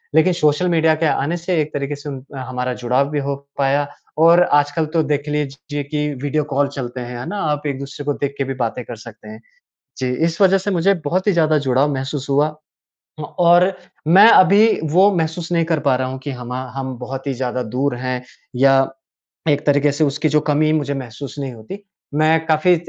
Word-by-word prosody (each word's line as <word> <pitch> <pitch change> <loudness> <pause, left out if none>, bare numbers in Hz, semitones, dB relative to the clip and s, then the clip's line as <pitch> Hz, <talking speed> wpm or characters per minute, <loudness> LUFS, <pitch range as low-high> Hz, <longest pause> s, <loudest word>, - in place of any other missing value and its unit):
लेकिन 175 +3 +4
social 155 +1 +1
media 160 -2 +3
के 160 +1 -1
आने 155 +3 0
से 175 0 -1
एक 150 - -5
तरीके 145 0 -3
से 145 +1 -8
उन 135 -2 -7
हमारा 125 0 -3
जुड़ाव 130 +4 +1
भी 150 - -1
हो 140 - -1 0.2
पाया। 140 +1 +1 0.3
और 170 +2 +6
आजकल 145 +1 +1
तो 160 - +3
देख 145 0 -2
लीजिए 145 0 -3
कि 150 +1 -2 0.2
वीडियो 150 +1 0
कॉल 140 +1 +2
चलते 130 -3 -6
हैं। 120 0 -6
है 125 - -6
ना? 205 - -4
आप 150 -1 -1
एक-दूसरे 140 +1 -6
को 145 - 0
देख 140 0 -4
के 135 - 0
भी 135 0 -4
बातें 120 +2 -4
कर 120 - -7
सकते 115 - -13
हैं। 215 - -10 0.6
जी, 130 -1 -1
इस 165 +6 -1
वज़ह 195 0 +5
से 195 +2 -3
मुझे 190 +1 +2
बहुत 185 +7 -1
ही 205 - +4
ज़्यादा 155 -3 +3
जुड़ाव 135 +4 +2
महसूस 135 +1 -4
हुआ। 145 +2 +3 0.7
हाँ, 150 - -4
और 175 +2 +5 0.3
मैं 195 +7 +8
अभी 205 +3 +5
वो 190 +5 +5
महसूस 165 +1 -2
नहीं 165 -1 +2
कर 165 -2 0
पा 140 -3 +2
रहा 130 0 -1
हूँ, 130 +1 -5
कि 140 +1 -6
हमा 125 0 -5
हम 130 -2 -4
बहुत 135 +3 -6
ही 135 - 0
ज़्यादा 125 0 -3
दूर 125 +4 -1
हैं, 125 0 -4 0.3
या 135 +1 +4 0.6
एक 145 -1 +1
तरीके 145 0 +3
से 145 +3 0
उसकी 145 +2 0
जो 150 +1 +3
कमी 155 +1 +2
मुझे 145 -2 0
महसूस 130 0 -7
नहीं 135 -2 -4
होती। 115 - -9 0.4
मैं 160 +1 +2
काफ़ी 160 +3 +4
145 Hz, 210 wpm, -19 LUFS, 135-160 Hz, 0.7 s, मैं